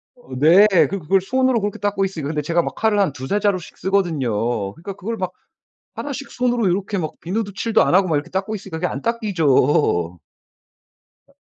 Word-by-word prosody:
어 245 - -11
네. 170 +9 +6 0.2
그 195 - -3
그걸 185 +4 +2
손으로 255 +2 +1
그렇게 205 0 -3
닦고 205 -1 0
있으니까. 165 -7 -4
근데 155 -1 -1
제가 170 +3 +1
막 - - -5
칼을 220 -2 +1
한 190 -8 +2
2-3 135 +11 -2
자루씩 195 -4 -1
쓰거든요. 175 -9 0 0.4
그러니까 195 - -8
그걸 220 +4 -5
막 185 -2 -3 0.6
1 285 - -5
씩 275 +1 -7
손으로 245 -3 0
요렇게 195 +3 -1
막 155 -4 -3
비누도 200 +4 -3
칠도 225 +2 +2
안 - - +1
하고 190 -1 +4
막 155 - +1
이렇게 145 - -3
닦고 195 +4 -2
있으니까 190 -5 -7
그게 180 - 0
안 - - -4
닦이죠. 150 - +1 1.1
아 - - -26
190 Hz, 375 characters per minute, -21 LUFS, 160-210 Hz, 1.1 s, 네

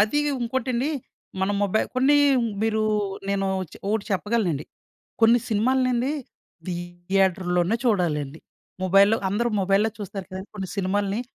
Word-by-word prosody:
అదీ 220 +8 +3 0.2
ఉంకోటండి, 250 +2 -1 0.5
మన 190 - +1
మొబైల్ 205 +2 +1
కొన్ని 275 +3 +4 0.5
మీరు 220 -1 +1 0.5
నేను 195 -1 0 0.3
చె - - -11
ఓటి 220 -1 0
చెప్పగలనండి. 190 -6 0 0.6
కొన్ని 230 +1 +6
సినిమాలనండీ 255 +3 +1 0.6
థియేటర్‌ 175 +1 -1
లోనే 175 +6 +2
చూడాలండి. 160 - 0 0.4
ముబైల్‌లో 195 +4 +5
అందరూ 235 +5 0
మొబైల్‌లో 195 +3 +2
చూస్తారు 195 -2 -6
కదండి 190 +2 -7
కొన్ని 190 -2 -4
సినిమాల్ని. 200 +2 0
200 Hz, 115 wpm, -24 LUFS, 185-230 Hz, 0.6 s, కొన్ని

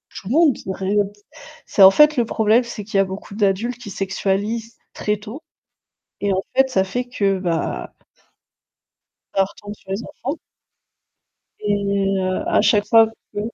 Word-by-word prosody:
tout 190 - -9
le - - -3
monde 305 -2 +4
ré 190 +1 -2
heu, 205 - +4
d 200 - -8 0.5
c'est 200 - +4
en 190 - +10
fait, 300 +7 +5
le 245 - +2
problème 220 +2 +2
c'est 235 -4 -7
qu'il 205 - -2
y - - +6
a - - +4
beaucoup 195 +2 -8
d'adultes 210 +4 0
qui 210 - -8
sexualisent 205 +4 -2 0.2
très 210 0 -1
tôt, 220 +9 -10 0.8
et 205 - +1
en 190 +1 -1
fait, 265 0 +4
ça 215 -7 +2
fait 245 +6 -3
que, 200 -6 0
bah 170 -3 -2 1.4
ça 195 - +4
retombe 205 +1 -10
sur 195 -2 -17
les 195 +4 -2
enfants. 295 -1 -5 1.3
Et 210 -1 0 0.5
heu, 185 0 -1
à - - +3
chaque 205 0 +3
fois 225 +1 +6 0.3
que 205 - -2
205 Hz, 175 wpm, -21 LUFS, 195-235 Hz, 1.4 s, en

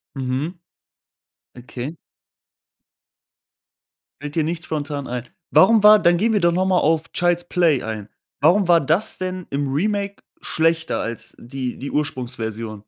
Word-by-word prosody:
Mhm. 135 +7 -3 1.0
Okay. 125 +4 -7 2.3
Fällt 145 0 -7
dir 160 - +2
nichts 165 +1 -3
spontan 145 -2 -4
ein. 125 0 -4 0.3
Warum 215 +2 +5
war 210 0 +9
dann 175 -3 +4
gehen 220 +5 +1
wir 210 - +3
doch 170 -2 +3
noch 185 +1 +1
mal 185 -1 +2
auf 160 +1 +1
„Child's 175 0 +1
Play“ 165 -7 +2
ein. 110 -2 -5 0.3
Warum 195 +1 +4
war 170 -1 +6
das 165 +9 0
denn 185 -1 -4
im 140 -1 -2
Remake 200 +5 -1 0.2
schlechter 160 0 0
als 115 0 -5
die 125 +1 -5
die 140 - -6
Ursprungsversion? 115 -7 -4
160 Hz, 140 wpm, -21 LUFS, 130-180 Hz, 2.3 s, war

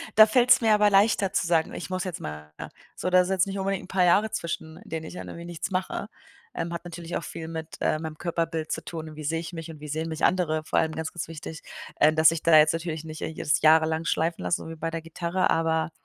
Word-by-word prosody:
Da 215 - +10
fällt's 250 +3 +5
mir 220 -2 +4
aber 210 0 +5
leichter 200 -1 +3
zu - - +1
sagen: 165 -2 +1
„Ich - - -6
muss 185 -1 -2
jetzt 180 -3 -5
mal 75 0 -7
wieder,“ - - -7 0.3
so - - -2
da 185 0 +6
ist 180 - -2
jetzt 190 0 +2
nicht 195 0 -4
unbedingt 195 0 -1
'n - - -16
paar 190 -1 +1
Jahre 205 +5 +4
zwischen 165 -1 -4
in - - -15
denen 160 0 -4
ich - - -8
dann - - -7
irgendwie 170 - -8
nichts 175 +2 -5
mache. 185 0 -2 0.5
Ähm, 170 - -3
hat 170 0 -5
natürlich 175 0 -5
auch - - -6
viel 160 +1 -7
mit, 160 -1 -7
äh, - - +2
meinem 155 0 -6
Körperbild 165 -2 -2
zu - - -3
tun, 160 -2 -7
wie 155 - -8
sehe 160 +2 -1
ich 170 +2 -7
mich 165 -1 -6
und 155 - -12
wie 150 - -9
sehen 155 +2 -3
mich 160 -1 -5
andere. 160 -4 +2
Vor - - -1
allem 160 - +2
ganz, 160 0 -4
ganz 175 - -5
wichtig, 160 -1 -8 0.4
ähm, 155 +1 +5
dass 160 0 +7
ich 165 -1 -3
da 165 - +6
jetzt 155 0 +5
natürlich 165 -1 -4
nicht 155 -1 -8
jetzt 155 -2 -1
jahrelang 160 +1 +4
schleifen 165 +1 0
lassen, 175 - 0
so - - -7
wie 165 - -7
bei 165 +1 -4
der 165 0 -4
Gitarre, 170 +3 -1
aber 160 -1 +1
165 Hz, 265 wpm, -26 LUFS, 160-180 Hz, 0.5 s, Da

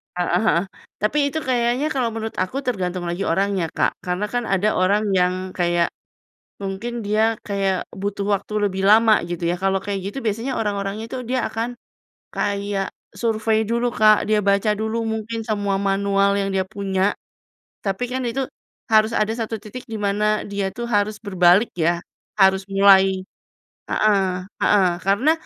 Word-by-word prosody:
Heeh 180 0 +1
heeh. 170 -5 +3 0.4
Tapi 215 +8 +1
itu 315 - -2
kayaknya 250 +3 +1
kalau 250 -3 0
menurut 225 0 -5
aku 185 +9 -5
tergantung 185 -7 -2
lagi 175 +3 -3
orangnya 190 -1 +1
Kak, - - +2
karena 180 +3 -1
kan 245 -1 0
ada 195 +2 +2
orang 200 +3 +2
yang 180 -1 +3 0.2
kayak 175 -1 +2 0.7
mungkin 225 +5 -4
dia 220 +2 +2
kayak 195 -2 0 0.2
butuh 200 0 -2
waktu 200 +2 -5 0.2
lebih 190 0 -4
lama 220 +1 +6
gitu 175 0 -5
ya. 175 - 0
Kalau 195 0 +2
kayak 200 -1 -3
gitu 205 +7 -5
biasanya 225 +5 -1
orang-orangnya 205 0 -2
itu 260 - -4
dia 255 +2 0
akan 230 +3 -4 0.6
kayak 200 -1 -2 0.2
survei 220 -1 0
dulu 235 +1 0
Kak, 215 0 +5
dia 215 -1 +3
baca 200 +2 +2
dulu 220 +2 -2
mungkin 220 +1 -3
semua 205 -2 0
manual 200 0 +2
yang 195 - -1
dia 190 -1 +1
punya, 195 0 0 0.7
tapi 195 +4 -2
kan 260 +1 -2
itu 265 +3 -1 0.5
harus 220 +1 +4
ada 215 +1 +1 0.3
titik 220 +5 -10
di 225 - -6
mana 210 +1 +1
dia 200 -1 -2
tuh 240 - -5
harus 210 0 +1
berbalik 190 +1 +4
ya, 170 +1 +1 0.3
harus 190 -1 +4
mulai 195 -1 +5 0.7
heeh, 210 -2 +3 0.4
heeh. 195 -3 +4
Karena, 200 +10 +3
205 Hz, 155 wpm, -22 LUFS, 195-220 Hz, 0.7 s, lama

